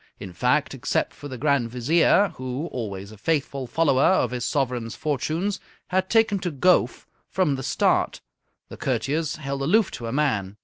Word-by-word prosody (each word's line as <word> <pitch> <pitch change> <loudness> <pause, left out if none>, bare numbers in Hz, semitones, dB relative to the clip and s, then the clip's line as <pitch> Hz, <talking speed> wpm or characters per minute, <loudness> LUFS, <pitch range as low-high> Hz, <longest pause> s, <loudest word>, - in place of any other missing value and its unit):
In 95 -3 -8
fact, 125 - +1
except 135 - -1
for 145 - -9
the 130 -2 -7
Grand 140 -4 +1
Vizier, 160 - +3
who, 130 +4 -4
always 100 -4 -5
a 110 - -14
faithful 140 -2 -1
follower 135 0 +2
of 130 -10 +3
his 125 -1 -3
sovereign's 125 -5 -1
fortunes, 155 +7 -2 0.3
had 185 +1 0
taken 225 -3 +3
to 180 -1 -2
Gowf 175 +4 +2 0.2
from 180 -7 +1
the 135 - -5
start, - - +1 0.5
the - - -10
courtiers 155 +2 -1
held 140 -2 -4
aloof 195 +8 +3
to 115 - -6
a - - -3
man. 110 -9 0
140 Hz, 170 wpm, -24 LUFS, 125-165 Hz, 0.5 s, Vizier